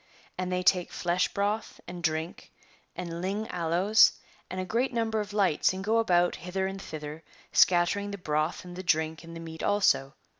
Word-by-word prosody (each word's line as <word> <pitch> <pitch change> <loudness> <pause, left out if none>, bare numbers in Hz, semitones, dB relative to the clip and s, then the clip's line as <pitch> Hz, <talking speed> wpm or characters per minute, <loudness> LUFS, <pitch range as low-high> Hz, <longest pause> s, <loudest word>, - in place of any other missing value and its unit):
And 185 0 -3
they 180 0 0
take 180 -1 +3
flesh 175 +1 0
broth, 205 +2 -2
and 175 -1 -7
drink, 160 0 -3 0.4
and 170 -1 -5
lign 200 +4 -2
aloes, 180 +5 +4 0.4
and 185 - -4
a 185 - -2
great 240 +7 0
number 225 -2 0
of 210 -1 -4
lights, 195 -5 +2
and 190 +1 -5
go 220 +3 +2
about 175 -5 +2
hither 185 +2 -3
and 195 0 -4
thither, 155 -1 -7 0.3
scattering 180 +3 +3
the 200 - -5
broth 155 0 -1
and 175 0 -9
the 185 - -5
drink 160 -2 0
and 165 0 -10
the - - -7
meat 160 -1 -8
also. 195 -9 +2
180 Hz, 185 wpm, -28 LUFS, 165-200 Hz, 0.4 s, aloes